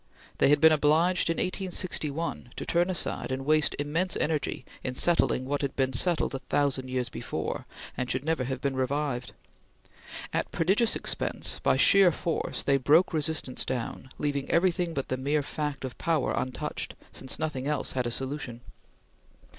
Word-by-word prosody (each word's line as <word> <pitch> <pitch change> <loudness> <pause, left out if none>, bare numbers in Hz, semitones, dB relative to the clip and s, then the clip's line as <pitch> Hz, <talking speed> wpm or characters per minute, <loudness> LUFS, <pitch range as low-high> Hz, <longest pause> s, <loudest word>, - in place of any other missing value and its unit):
They - - +5
had 150 0 +5
been 160 +1 +7
obliged, 160 +4 +3
in 165 - +1
1861, 170 -8 -2
to - - -5
turn 175 +2 +2
aside 180 -6 -2
and 130 +1 -3
waste 155 0 +3
immense 160 +6 0
energy 150 -4 -1 0.2
in 130 -1 -3
settling 165 -5 +2
what 145 +2 -1
had 140 -2 -2
been 130 -1 0
settled 170 +5 +3
a 135 - -3
thousand 135 -1 0
years 130 -1 -1
before, - - -4 0.3
and 125 0 -3
should 130 +2 -1
never 160 -5 0
have 130 0 -4
been 140 -1 -1
revived. 130 -1 -2 1.0
At - - -1
prodigious 195 +7 +2
expense, - - -1
by - - +3
sheer 195 -3 +6
force, 165 +1 -2
they 140 0 +3
broke 155 +8 +4
resistance 155 -4 0
down, 130 +1 -4
leaving 140 -2 -2
everything 170 -1 +1
but 135 - -3
the 130 - -1
mere 145 +3 0
fact 150 -1 -3
of 130 - -6
power 160 -4 +1
untouched, 130 - -3 0.2
since 130 - -3
nothing 150 -4 -3
else 150 -1 0
had 125 -2 -1
a - - -2
solution. 135 -2 -3
145 Hz, 165 wpm, -28 LUFS, 130-165 Hz, 1.0 s, been